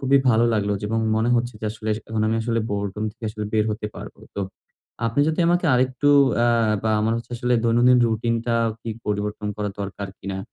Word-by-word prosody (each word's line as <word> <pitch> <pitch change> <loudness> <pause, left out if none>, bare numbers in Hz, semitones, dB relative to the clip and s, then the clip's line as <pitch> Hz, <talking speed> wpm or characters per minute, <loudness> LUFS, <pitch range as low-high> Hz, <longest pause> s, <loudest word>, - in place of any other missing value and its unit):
খুবই 140 - +7
ভালো 115 +1 +4
লাগলো 105 -1 0
যে, - - -5
এবং 115 +1 0 0.2
মনে 115 +2 +1
হচ্ছে 120 0 -1
যে, - - -5
আসলে 110 0 -7 0.2
এখন 110 -1 -2
আমি 110 - +1
আসলে 115 0 0
বোরডোম 100 +1 -2
থেকে 115 0 -11
আসলে 105 -1 -5
বের 110 -1 +2
হতে 105 0 -3
পারবো। - - -9 0.2
তো 100 - -3 0.7
আপনি 115 +5 +1
যদি 160 +2 0
আমাকে 175 0 +2
আরেকটু 130 +3 +1 0.4
আ - - +4 0.4
বা 110 - +1
আমার 110 +1 +1
হচ্ছে 115 - -10
আসলে, 125 0 +1
দৈনন্দিন 120 +2 +5
রুটিনটা 115 +1 0 0.3
কি 115 - -5 0.2
পরিবর্তন 105 0 -2
করা 105 -1 -2
দরকার 100 0 -5
কিনা? 95 0 -5
115 Hz, 200 wpm, -23 LUFS, 105-120 Hz, 0.7 s, খুবই